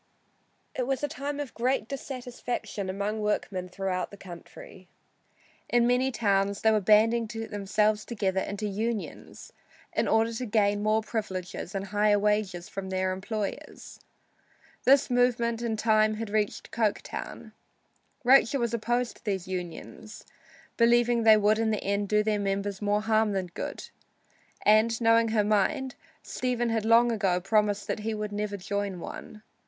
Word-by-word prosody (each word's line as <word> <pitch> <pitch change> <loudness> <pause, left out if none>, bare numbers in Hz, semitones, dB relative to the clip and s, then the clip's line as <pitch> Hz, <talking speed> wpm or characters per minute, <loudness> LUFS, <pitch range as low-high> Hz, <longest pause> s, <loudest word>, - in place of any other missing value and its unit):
It 250 -1 -2
was 270 +1 -1
a - - +2
time 290 -1 -5
of 285 -4 -5
great 245 -2 0
dissatisfaction 245 -6 -5
among 200 +3 -2
workmen 195 -3 -2
throughout 185 0 -3
the 200 - -12
country. 195 - -12 0.8
In 240 -1 +3
many 250 +2 +2
towns 200 -3 +1
they 220 - +4
were 215 - +3
banding 220 +3 +4
themselves 215 -1 -1
together 195 -5 -1
into 205 +2 -4
"unions" 215 +2 -4 0.4
in - - 0
order 225 +1 +2
to 250 +3 -4
gain 205 -1 +2
more 215 +1 +2
privileges 195 -4 -5
and 195 0 -2
higher 205 +1 +2
wages 205 -3 0
from 195 -2 -6
their 185 0 0
employers. 200 +2 -5 0.9
This 270 0 +5
movement 235 -2 +2
in 230 -2 -2
time 215 0 +3
had 220 -1 -5
reached 210 -1 -1
Coketown. 220 -3 -3 0.7
Rachel 270 +1 +5
was 235 -1 -1
opposed 240 +2 -1
to - - -25
these 190 -4 -2
unions, 185 +4 -7 0.5
believing 240 0 +4
they 220 -1 +7
would 215 +1 +3
in 225 -1 +1
the 215 - -1
end 200 0 -1
do 210 0 +3
their 210 -1 0
members 200 0 -2
more 205 0 +1
harm 220 -1 +2
than 185 -3 -3
good, - - -6 0.8
and 220 +2 +4
knowing 230 -1 +4
her 220 -1 +2
mind, 215 +6 +1 0.3
Stephen 245 -2 -1
had 225 -1 -1
long 235 +1 +5
ago 195 -5 +1
promised 205 +1 +1
her - - 0
that 215 - -9
he 220 +1 -2
would 210 -1 -4
never 205 0 -3
join 200 -1 -3
one. 215 +5 -9
215 Hz, 155 wpm, -28 LUFS, 200-230 Hz, 0.9 s, they